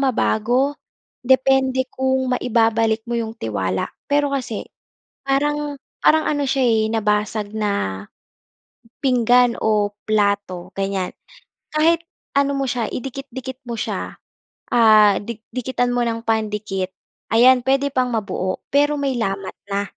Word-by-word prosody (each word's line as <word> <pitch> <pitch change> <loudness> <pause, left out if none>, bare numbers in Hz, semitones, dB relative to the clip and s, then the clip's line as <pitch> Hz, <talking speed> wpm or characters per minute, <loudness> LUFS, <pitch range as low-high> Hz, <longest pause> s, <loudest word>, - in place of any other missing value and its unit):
mabago 260 +1 +1 0.5
depende 260 0 +3
kung 260 0 0
maibabalik 225 -2 +2
mo 235 - -1
'yung 225 -1 -2
tiwala. 95 -3 -2 0.2
Pero 290 0 +1
kasi 235 -5 -5 0.6
parang 290 +1 0 0.2
parang 315 0 +4
ano 290 -1 0
siya 270 0 0
eh 220 -2 +2
nabasag 210 -1 -1
na 200 - -1 1.0
pinggan 245 -2 +4
o 210 -2 +2 0.2
plato 200 -4 0
ganyan. 195 -2 -1 0.7
Kahit 330 +2 +3 0.3
ano 280 0 +2
mo 275 - 0
siya 240 -3 -1
idikit-dikit 260 0 -6
mo 235 - -3
siya, - - -4 0.6
ah, 215 -3 +6
di 220 +1 -7
dikitan 245 0 -1
mo 245 - +1
ng 230 0 -3
pandikit 210 -4 -1 0.4
ayan 250 +3 +6
puwede 275 +1 +2
pang 255 -1 +2
mabuo 190 -4 -2
pero 290 +1 +3
may 275 -2 0
lamat 195 -2 -3 0.2
na. 200 0 0
235 Hz, 125 wpm, -21 LUFS, 210-265 Hz, 1.0 s, ah